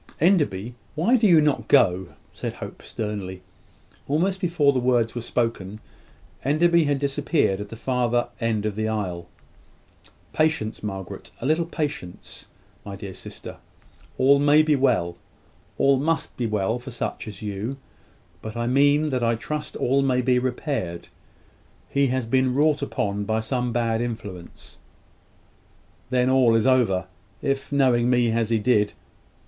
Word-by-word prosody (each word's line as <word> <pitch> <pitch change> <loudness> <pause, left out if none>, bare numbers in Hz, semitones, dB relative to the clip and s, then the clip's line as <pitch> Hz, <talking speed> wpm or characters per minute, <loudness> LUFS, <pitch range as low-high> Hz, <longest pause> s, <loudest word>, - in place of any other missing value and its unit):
"Enderby, 140 - +2 0.2
why 175 +11 +3
do 205 -9 +5
not 150 -4 +2
you 110 - -11
go?" 90 +1 +4 0.3
said - - -5
Hope, - - -9
sternly. 100 -4 -5 0.6
Almost 185 +7 0
before 165 -6 +2
the 130 - +1
words 120 -2 +1
were 120 - -4
spoken, 115 -4 -2 0.6
Enderby 170 +4 +3
had 145 -1 +1
disappeared 140 - 0
at 105 - -7
the 115 - -8
further 120 0 0
end 110 -3 -1
of 105 - -1
the 110 +2 -2
aisle. 95 -6 -3 1.1
"Patience, 155 -8 0
Margaret! 95 -3 -6
A - - -6
little 160 +4 +1
patience, 150 - -5 0.4
my 100 - -7
dear 100 -1 -8
sister. - - -9 0.6
All 140 +2 +5
may 145 +2 +5
be 155 -1 +3
well; 115 -11 +1 0.6
all 135 0 +4
must 160 +4 -1
be 120 - -2
well 110 +2 -1
for 125 - -9
such 120 -2 -4
as 105 -1 -8
you; 105 +6 -4 0.6
but 110 +1 -7
I 120 - -1
mean 145 +4 +3
that 130 -3 -1
I 115 0 +2
trust 150 +6 -5
all 135 +2 +2
may 130 -2 +2
be 125 0 +2
repaired. 125 - -3 0.8
He 140 0 +2
has 130 -1 -1
been 130 +2 +1
wrought 150 +1 +3
upon 105 -7 -2
by 110 +2 0
some 125 +1 -2
bad 115 -1 0
influence 105 -7 -7 0.6
" - - -35
"Then 125 -1 +2
all 130 -3 +4
is 115 - +2
over. 115 -9 +3 0.4
If, 135 0 -1
knowing 125 -4 +3
me 120 -2 +3
as 115 -1 0
he 115 - +2
did 105 -2 +2
125 Hz, 155 wpm, -24 LUFS, 110-140 Hz, 1.1 s, do